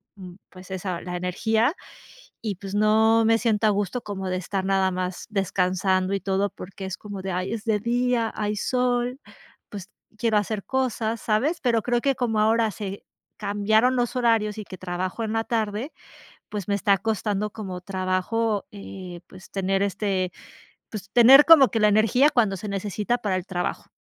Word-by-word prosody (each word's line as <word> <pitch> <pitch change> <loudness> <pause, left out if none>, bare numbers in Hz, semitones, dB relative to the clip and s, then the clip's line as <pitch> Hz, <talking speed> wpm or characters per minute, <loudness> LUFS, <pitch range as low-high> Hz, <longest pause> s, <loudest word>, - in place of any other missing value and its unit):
mm, 180 -3 -11
pues 185 0 -14
esa 185 -2 -3
la 180 0 -5
energía 220 - 0 0.7
y, 210 -4 -3
pues, 195 +1 -8
no 220 +2 +4
me 225 0 +4
siento 220 -2 +1
a - - +5
gusto 205 +4 -1
como 195 -2 -5
de 185 - -1
estar 190 +1 -3
nada 190 -1 +2
más 180 0 -4
descansando 185 -1 0
y 195 - 0
todo, 195 +1 0
porque 190 +1 -9
es 190 0 -5
como 205 -2 -8
de 190 0 -4
"ay, 185 +3 -2
es 220 -1 -5
de 215 -2 +1
día, 240 0 0
hay 210 0 -2
sol, 250 +3 0 0.5
pues 200 -2 -8 0.3
quiero 225 -2 +1
hacer 205 0 -3
cosas", 235 -4 -1
¿sabes?, 265 +11 0
pero 230 -4 +2
creo 240 +1 +1
que 275 -1 +2
como 230 -4 -1
ahora 225 0 +3
se 200 -1 -6 0.3
cambiaron 220 +5 +2
los 240 0 0
horarios 225 -3 +1
y 210 - -5
que 185 - -10
trabajo 185 +4 -4
en 215 - -3
la 225 0 0
tarde, 225 +4 -2 0.6
pues 205 -3 -5
me 200 - +1
está 200 0 +3
costando 210 0 -2
como 185 -5 -7
trabajo, 195 +3 -1
eh, 185 -3 -9
pues 185 0 -14
tener, 195 0 0
este, 195 -2 -1 0.6
pues 200 -2 -7
tener 260 +4 +8
como 310 -6 +8
que 225 - -1
la 210 - +5
energía 225 +7 +4
cuando 225 -9 +2
se 210 - -7
necesita 205 +4 -1
para 205 -5 -1
el 180 - -5
trabajo. 180 -1 -4
210 Hz, 180 wpm, -24 LUFS, 190-225 Hz, 0.7 s, tener